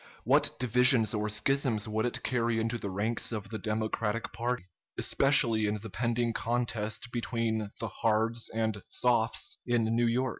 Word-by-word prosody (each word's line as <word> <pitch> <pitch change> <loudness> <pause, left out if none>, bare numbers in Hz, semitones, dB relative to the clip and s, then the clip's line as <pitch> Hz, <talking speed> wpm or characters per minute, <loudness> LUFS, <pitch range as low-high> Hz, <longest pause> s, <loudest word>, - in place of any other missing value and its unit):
What - - +3
divisions 125 -1 +4
or 105 0 -1
schisms 115 0 +1
would 110 +2 0
it - - -4
carry 120 -2 0
into 115 +1 -1
the 100 - -4
ranks 105 +6 -1
of 105 -2 -4
the 110 0 -5
Democratic 110 +1 -2
party, 120 -3 -2 0.3
especially 115 -6 +3
in 105 +1 -1
the 110 0 -9
pending 120 +2 0
contest 115 0 -2
between 115 -3 -1
the 115 - -2
"Hards" 115 +2 0
and 110 -2 -2
"Softs" 120 -2 +1
in 120 -2 +1
New 120 0 +3
York? 125 +3 +1
115 Hz, 155 wpm, -30 LUFS, 110-120 Hz, 0.3 s, divisions